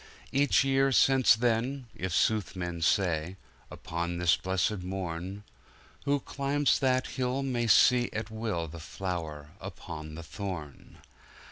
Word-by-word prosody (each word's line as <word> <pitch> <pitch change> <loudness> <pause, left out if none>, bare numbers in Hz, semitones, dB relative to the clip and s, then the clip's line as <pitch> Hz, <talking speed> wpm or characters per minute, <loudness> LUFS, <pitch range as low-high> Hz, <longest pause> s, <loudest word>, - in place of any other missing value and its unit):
Each 140 0 +3
year 135 0 +3
since 130 -2 +5
then 120 +3 0
(if 95 0 -3
sooth 105 +3 +1
men 90 -2 -4
say) 85 0 +1 0.3
Upon 85 +1 -4
this 85 -1 +4
Blessed 95 +2 -1
Morn, 90 +1 -5 0.6
Who 140 0 +1
climbs 140 +2 +1
that 130 -1 +2
Hill, 130 +1 -2
may 120 -3 -1
see 120 +3 +5
at 110 0 -4
will 110 -7 -2
The 80 +2 -9
flower 80 -4 -5
upon 85 -5 -8
the 85 - -7
thorn! 85 -5 -7
95 Hz, 130 wpm, -29 LUFS, 85-125 Hz, 0.6 s, since